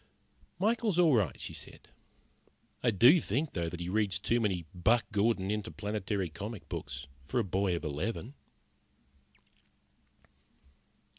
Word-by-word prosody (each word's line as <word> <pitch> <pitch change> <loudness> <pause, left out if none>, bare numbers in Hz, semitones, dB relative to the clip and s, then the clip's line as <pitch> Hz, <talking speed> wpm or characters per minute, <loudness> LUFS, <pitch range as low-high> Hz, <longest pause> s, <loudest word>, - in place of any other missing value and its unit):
"Michael 220 +4 +1
is 180 - 0
all 170 -4 +5
right," 100 - +1
she - - -5
said. - - -8 0.9
"I 120 - +3
do 120 - +7
think, 140 +5 -1
though, 85 -2 -1
that 90 - -7
he 85 - -4
reads 100 -1 +1
too 120 +5 +1
many 95 -6 0
Buck 110 +7 +3
Gordon 100 -2 +1
Interplanetary 105 -2 -2
comic 100 +7 -7
books 65 +2 -5 0.2
for 75 - -1
a - - +2
boy 95 -1 0
of 85 - -4
eleven." 95 - -3
105 Hz, 135 wpm, -31 LUFS, 90-120 Hz, 0.9 s, do